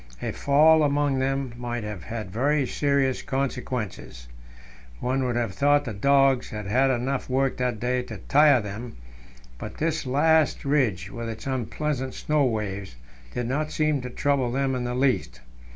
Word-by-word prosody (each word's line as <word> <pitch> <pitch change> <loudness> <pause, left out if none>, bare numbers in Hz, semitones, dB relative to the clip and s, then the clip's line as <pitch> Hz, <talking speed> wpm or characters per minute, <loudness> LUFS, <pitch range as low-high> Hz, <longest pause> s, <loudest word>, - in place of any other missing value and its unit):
A - - -3
fall 155 +3 +4
among 145 -2 +1
them 135 -1 -1
might 120 -1 -4
have 105 -3 -6
had 110 -5 -6
very 140 +6 +1
serious 140 -1 0
consequences. 125 - -4 0.7
One 130 +1 0
would 125 -2 -1
have 115 -5 -1
thought 145 +5 +3
the 115 - -4
dogs 135 +3 +3
had 105 -1 -6
had 130 +7 +2
enough 130 +2 -1
work 135 +1 +1
that 125 -3 -1
day 125 +2 0
to 115 -4 -8
tire 140 +5 +4
them, 105 +4 -7 0.6
but - - -7
this 160 -3 -1
last 155 +4 +2
ridge, 110 -10 +1
with 115 -1 -5
its 110 -1 -7
unpleasant 130 +1 -2
snow 150 -1 +1
waves, 100 - -3 0.4
did 125 - -1
not 150 +4 -1
seem 155 -3 +1
to 125 - -6
trouble 135 -1 0
them 135 +1 0
in 125 -1 -2
the 120 0 -2
least. 125 - 0
130 Hz, 165 wpm, -25 LUFS, 115-140 Hz, 0.7 s, fall